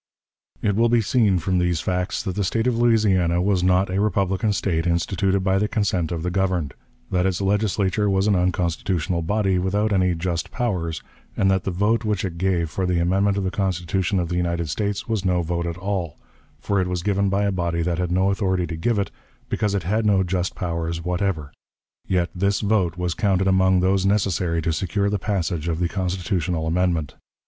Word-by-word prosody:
It 105 -2 +1
will 115 +2 +3
be 120 0 +3
seen 105 -3 +2
from 90 +1 0
these 90 -2 +1
facts 90 +1 -2
that 95 - -3
the 100 - -1
State 110 +5 0
of 125 -2 +2
Louisiana 105 -7 +3
was 95 0 +1
not 90 +1 +2
a 95 +2 +1
republican 100 0 +1
State 85 -3 0
instituted 95 +3 +1
by 95 0 +2
the 105 - +1
consent 95 -7 -1
of 80 -2 -3
the 90 - -1
governed; 90 -6 0 0.4
that 90 0 +2
its 95 -2 -1
Legislature 100 0 +1
was 95 0 +2
an 105 -2 +3
unconstitutional 90 -1 0
body, 95 +1 +1
without 100 +4 0
any 90 -2 +2
"just 85 -1 -2
powers," 90 -10 -2 0.3
and 95 0 +3
that 95 -1 0
the - - 0
vote 105 +6 +1
which 105 -3 -1
it 85 -3 -5
gave 85 -4 0
for 95 -1 -1
the 90 -1 +1
amendment 95 +4 +2
of 100 - 0
the 95 - -1
Constitution 95 0 -1
of 85 -2 -2
the 90 - -1
United 85 -2 -1
States 100 +5 -2
was 110 -4 -1
no 90 -2 +1
vote 85 +1 -2
at 85 0 -4
all; 95 -4 -3 0.4
for 100 -2 0
it 90 - -1
was 90 -1 -3
given 100 0 +1
by 100 +1 +1
a 100 - +1
body 85 -2 -1
that 85 0 -1
had 90 -1 -1
no 95 +2 +2
authority 95 -3 0
to 85 - -5
give 105 +8 0
it, 100 - -1 0.4
because 105 -1 0
it 95 - -1
had 105 +6 0
no 100 -3 +3
"just 90 0 -2
powers" 85 -1 -3
whatever. 90 -5 -1 0.6
Yet 90 -2 0
this 100 +2 0
vote 100 -5 +1
was 90 -1 -1
counted 95 -2 +1
among 95 -1 +3
those 95 +1 +2
necessary 95 -4 +1
to 80 - 0
secure 100 +5 -1
the 105 - 0
passage 90 -5 -2
of 80 -1 -1
the 90 0 0
constitutional 90 -2 -2
amendment. 85 -3 0
95 Hz, 205 wpm, -23 LUFS, 85-100 Hz, 0.6 s, will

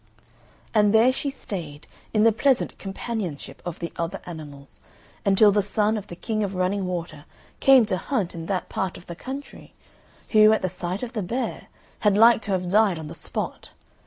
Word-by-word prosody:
And 210 -1 +4
there 240 +4 +6
she 280 - -2
stayed, 170 - -7 0.3
in 215 -1 +3
the 225 - +6
pleasant 255 +3 +1
companionship 195 -8 -5
of 175 -2 -5
the 170 - -6
other 170 0 -3
animals, 145 -5 -10 0.4
until 200 +1 +5
the 205 +1 +3
son 210 +2 +1
of 210 -2 -5
the 175 - -8
King 215 +4 -2
of 200 -1 -3
Running 185 +1 0
Water 170 -4 -5 0.3
came 265 -4 +6
to 185 - -1
hunt 205 -3 -2
in 165 -1 -7
that 185 -2 -2
part 190 -2 -3
of 170 - -14
the 170 - -7
country, 270 +9 -9 0.5
who, 215 -1 +6
at 220 - 0
the 185 - +1
sight 180 +3 -4
of 245 0 -5
the 220 - -2
bear, 235 +8 -3 0.3
had 205 -2 +3
like 230 +1 +6
to 205 - -4
have 185 -1 0
died 205 -4 +4
on 155 -1 -7
the - - -7
spot. - - -5
200 Hz, 190 wpm, -24 LUFS, 175-220 Hz, 0.5 s, there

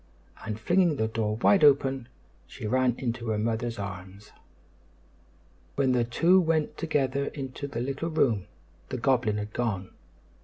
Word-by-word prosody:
and, 110 -1 -4
flinging 175 - +2
the 110 -5 0
door 110 -1 -1
wide 155 - +4
open, 135 -3 +4 0.4
she - - -9
ran 125 +2 +2
into 120 -2 -3
her 110 -1 0
mother's 115 +2 -2
arms. 95 0 -8 1.4
When 135 -2 +2
the 125 -1 +2
two 170 +10 +4
went 160 -2 0
together 140 -4 0
into 135 0 -6
the 130 -4 -4
little 140 +6 -3
room, 115 - +1 0.4
the - - -3
goblin 120 -4 +1
had 105 0 -5
gone. 105 -6 -2
120 Hz, 145 wpm, -27 LUFS, 110-140 Hz, 1.4 s, wide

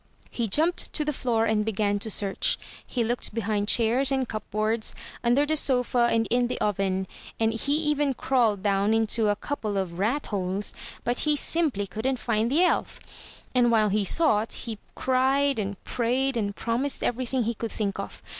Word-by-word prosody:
He 235 -2 -2
jumped 320 - +1
to 300 - 0
the 300 - -1
floor 230 -4 0
and 220 -1 +1
began 205 -1 0
to 220 - -5
search. 200 -1 +1 0.3
He 245 - -2
looked 235 -1 -1
be 230 - 0
hind 205 -1 -1
chairs 240 +5 +3
and 265 -2 0
cupboards; 215 +1 -1 0.3
under 245 +5 +3
the 310 +1 0
sofa 250 -4 +2
and 225 0 +1
in 245 0 +2
the - - -4
oven, 190 -2 0 0.3
and 225 0 +2
he 280 +6 0
even 295 -3 +1
crawled 230 -8 +1
down 200 +1 +2
into 225 0 +2
a 205 - +2
couple 215 -6 -4
of 180 -3 -3
ratholes 205 -4 -1 0.2
— - - -17
^but 240 +1 +1
he 300 -1 +2
simply 290 -9 +2
couldn't 245 +7 -2
find 230 -1 0
the 320 +6 +4
elf. 360 - 0 0.5
And 245 -2 +4
while 220 -2 +3
he 205 +1 +1
sought, 220 - +2
he 225 -4 -6 0.2
cried 265 0 +2
and 200 -1 -3
prayed 255 +3 0
and 200 -3 -2
promised 245 +4 0
every 245 +1 -1
thing 255 0 0
he 230 +2 -1
could 230 0 -5
think 200 -3 -3
of. - - -7
230 Hz, 185 wpm, -26 LUFS, 210-260 Hz, 0.5 s, the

